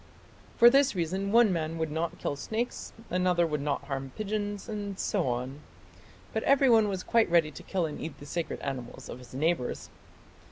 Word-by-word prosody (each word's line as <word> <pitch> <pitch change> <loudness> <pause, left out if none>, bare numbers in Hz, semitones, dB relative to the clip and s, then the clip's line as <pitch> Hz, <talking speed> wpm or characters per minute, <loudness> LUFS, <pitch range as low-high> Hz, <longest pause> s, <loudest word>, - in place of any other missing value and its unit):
For 235 - +8
this 275 -4 +4
reason 190 +3 -1
one 230 -3 +5
man 165 -1 -2
would 160 -2 -2
not 160 +2 -2
kill - - -2
snakes, 220 - -3 0.2
another 180 -1 +2
would 150 -3 -2
not 145 0 -1
harm 135 -2 -5
pigeons, 205 -1 -3
and 205 -3 -4
so 190 -7 0
on; 125 +3 -3 0.7
but - - 0
everyone 250 -6 +5
was 190 -2 -3
quite 230 -4 +3
ready 165 -3 +3
to - - -10
kill 185 -3 -1
and 150 - -5
eat 160 -2 -6
the 145 - -11
sacred 170 +3 -3
animals 125 -3 -6
of - - -7
his 125 0 -13
neighbours." 155 -2 -1
170 Hz, 185 wpm, -29 LUFS, 145-205 Hz, 0.7 s, For